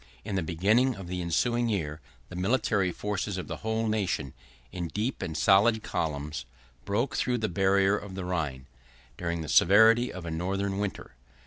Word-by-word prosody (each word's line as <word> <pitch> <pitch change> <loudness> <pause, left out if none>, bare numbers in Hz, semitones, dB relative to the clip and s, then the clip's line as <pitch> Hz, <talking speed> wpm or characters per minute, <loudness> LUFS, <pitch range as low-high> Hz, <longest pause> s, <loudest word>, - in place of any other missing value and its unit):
In 105 - -4
the 95 - +1
beginning 105 +11 +2
of 95 -3 -9
the 90 0 -3
ensuing 120 +8 +1
year, 80 -7 -2 0.3
the 90 - -9
military 100 -1 +1
force 105 +3 -3
of 90 - -5
the - - -5
whole 110 +1 -1
nation, 100 -11 -1 0.4
in 90 -2 -4
deep 110 +9 -3
and 80 -1 -3
solid 110 +5 +4
columns, 75 -4 -3 0.4
broke 110 +7 -1
through 125 -1 +1
the 110 -2 -1
barrier 95 +1 +3
of 100 -2 -9
the 95 -1 -4
Rhine, 75 -8 -3 0.5
during 85 -1 -3
the 80 - -6
severity 110 +9 +5
of 90 -2 -8
a 80 - -4
northern 95 +4 -2
winter. 100 -10 -4
95 Hz, 175 wpm, -28 LUFS, 85-110 Hz, 0.5 s, severity